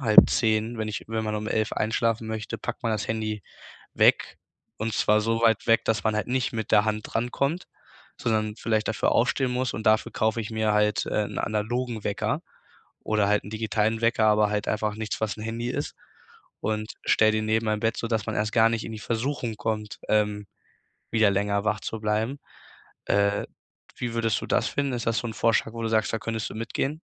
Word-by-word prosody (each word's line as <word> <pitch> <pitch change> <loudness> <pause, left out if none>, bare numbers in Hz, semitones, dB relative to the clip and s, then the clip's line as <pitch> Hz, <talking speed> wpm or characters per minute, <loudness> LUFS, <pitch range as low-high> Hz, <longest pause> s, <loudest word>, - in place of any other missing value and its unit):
09:30, 110 -1 +5
wenn 110 - -2
ich 110 +1 -4
wenn 110 0 -1
man 105 0 -2
um 105 +1 -4
11:00 110 -1 0
einschlafen 115 +1 0
möchte, 110 -1 -4
packt - - -5
man 115 - +1
das 105 -1 -2
Handy 110 -2 -2 0.5
weg - - +3 0.4
und 110 0 -2
zwar 105 0 +3
so 115 +1 0
weit 115 -2 +3
weg, 115 -1 +4
dass 110 0 0
man 110 -1 +2
halt 105 - -1
nicht 130 0 0
mit 110 -1 -3
der 105 - +6
Hand 110 0 0
drankommt, 140 +8 -1 0.5
sondern 110 -1 0
vielleicht 110 -2 0
dafür 110 - +1
aufstehen 125 +2 +2
muss 125 -1 -1
und 110 - -4
dafür 110 0 +3
kaufe 110 +1 +1
ich 105 - -5
mir 110 -1 +1
halt 105 -1 +2
äh, 105 - 0
'n - - -8
analogen 110 +2 -2
Wecker 100 - -1 0.6
oder 105 -2 +1
halt 105 - +2
'n - - -7
digitalen 110 0 0
Wecker, 115 -1 +3
aber 105 -1 +4
halt 105 -1 -1
einfach 105 -1 -1
nichts, 110 0 -4
was 110 0 -1
'n 110 - -6
Handy 115 +2 -3
ist - - -3 0.7
und 110 0 -2
stelle 110 0 +4
den 110 0 0
neben 110 +1 +1
mein 105 0 +1
Bett, 115 0 +1
sodass 115 -2 -1
man 110 - -2
erst 105 +1 0
gar 115 -1 +6
nicht 115 -1 -1
in 115 - -6
die 110 - -6
Versuchung 115 0 -2
kommt, 105 -3 -3
ähm, 105 -1 +1 0.7
wieder 110 -2 +4
länger 100 +1 0
wach 105 -1 0
zu 115 - -4
bleiben. 110 +6 0 0.7
Äh, 100 0 +2 0.5
wie 120 -1 -3
würdest 115 -2 +1
du - - -4
das - - +2
finden? 140 -2 -1
Ist 120 -1 -3
das 115 - +1
so - - -6
'n 110 - -5
Vorschlag, 115 0 +1
wo 115 - -5
du - - 0
sagst, 110 -1 +1
da 115 - 0
könntest 110 0 -3
du - - -9
mitgehen? 135 +6 -2
110 Hz, 210 wpm, -26 LUFS, 105-115 Hz, 0.7 s, der